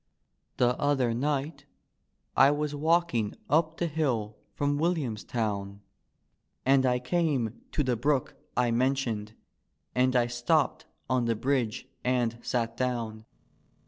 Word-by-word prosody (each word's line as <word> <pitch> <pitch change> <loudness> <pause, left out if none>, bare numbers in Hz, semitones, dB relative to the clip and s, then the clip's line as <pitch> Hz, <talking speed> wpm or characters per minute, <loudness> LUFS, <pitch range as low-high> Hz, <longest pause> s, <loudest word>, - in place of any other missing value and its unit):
The 125 0 +3
other 135 -5 +2
ni^t 140 +3 -2 0.7
I 135 - +7
was 145 0 -1
walking 155 -7 +1 0.2
up 160 +1 +2
the 175 - 0
hill 130 -10 -1 0.2
from 145 0 0
Will 170 +3 +2
iamstown 105 - -3 0.8
And 135 0 +4
I 125 0 +3
came 125 -4 0
to 150 - +1
the 125 -2 +1
brook 135 +3 0 0.2
I 125 -1 +3
mentioned, 115 -4 0 0.6
and 130 +1 +2
I 120 -1 +4
supped 120 +5 0 0.2
on 130 -2 +1
the 115 -1 +1
bridge 125 -2 -1 0.2
and 120 -2 0
sat 115 -1 -1
down. 115 -3 -2
125 Hz, 125 wpm, -28 LUFS, 115-145 Hz, 0.8 s, I